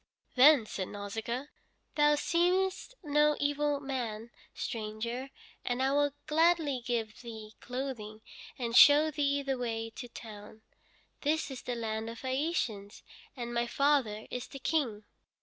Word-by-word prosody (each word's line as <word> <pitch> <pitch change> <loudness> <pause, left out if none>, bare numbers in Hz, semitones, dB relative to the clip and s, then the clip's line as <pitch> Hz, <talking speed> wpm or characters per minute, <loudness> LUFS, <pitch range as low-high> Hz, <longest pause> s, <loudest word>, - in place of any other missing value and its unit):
Then 270 -2 +7
said 190 -3 -4
Nausicaa: 225 +7 -5 0.4
"Thou 295 0 +4
seemest 365 +9 +1
no 295 0 +3
evil 290 0 +1
man, 240 -5 -4 0.2
stranger, 230 +4 -4 0.3
and 245 0 -1
I 265 - +2
will 290 0 +2
gladly 315 -4 +2
give 230 -3 -3
thee 220 -3 -9
clothing 245 -4 -5 0.3
and 235 -2 -3
show 295 +3 +8
thee 285 -1 0
the 270 -2 -2
way 225 -2 -3
to 245 - -6
town. 215 -1 -11 0.6
This 300 0 0
is 260 - -6
the 245 - -4
land 220 -1 -3
of 230 +2 -9
the 260 - -2
Phæacians, 255 - -2 0.3
and 240 -1 -4
my 235 0 0
father 255 -5 +1
is 250 - -4
the 275 - -9
King." 255 -7 -1
255 Hz, 140 wpm, -31 LUFS, 225-290 Hz, 0.6 s, show